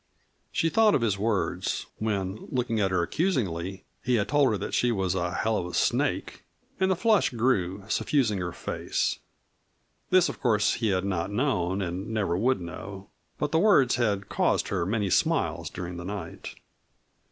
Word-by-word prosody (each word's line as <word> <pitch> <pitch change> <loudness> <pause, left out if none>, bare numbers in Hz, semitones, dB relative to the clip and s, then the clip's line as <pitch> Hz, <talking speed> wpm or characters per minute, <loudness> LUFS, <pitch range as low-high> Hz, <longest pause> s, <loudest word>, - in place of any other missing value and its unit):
She 165 - +1
thought 220 +2 +4
of - - +1
his 105 -4 0
words, 105 -1 -1
when, 100 -2 -2
looking 120 -3 -1
at 95 -2 +2
her 95 -2 +1
accusingly, 95 - -1 0.2
he 125 - +2
had 105 -3 0
told 145 -2 +4
her 105 - 0
that - - -5
she 125 - +2
was 95 -5 0
"a 90 -2 -1
hell 110 +4 0
of 90 - -3
a 90 - -6
snake," - - 0 0.4
and 190 0 +2
the 190 - +3
flush 215 +2 +3
grew, 105 -7 0
suffusing 110 -2 +1
her 90 -1 -3
face. - - -2 0.9
This 185 -1 +5
of - - -7
course 105 -4 +3
he 115 - -1
had 95 -1 +1
not 95 -2 -1
known 100 -5 0
and 90 +3 -4
never 110 -6 0
would 120 +5 +2
know, 95 +3 -8 0.3
but 150 - -2
the 160 - +3
words 165 - +4
had 105 -5 0
caused - - +1
her 90 -3 -1
many 105 -2 0
smiles - - +1
during 90 -1 -6
the 85 - -7
night. 100 +1 -6
105 Hz, 175 wpm, -27 LUFS, 95-125 Hz, 0.9 s, This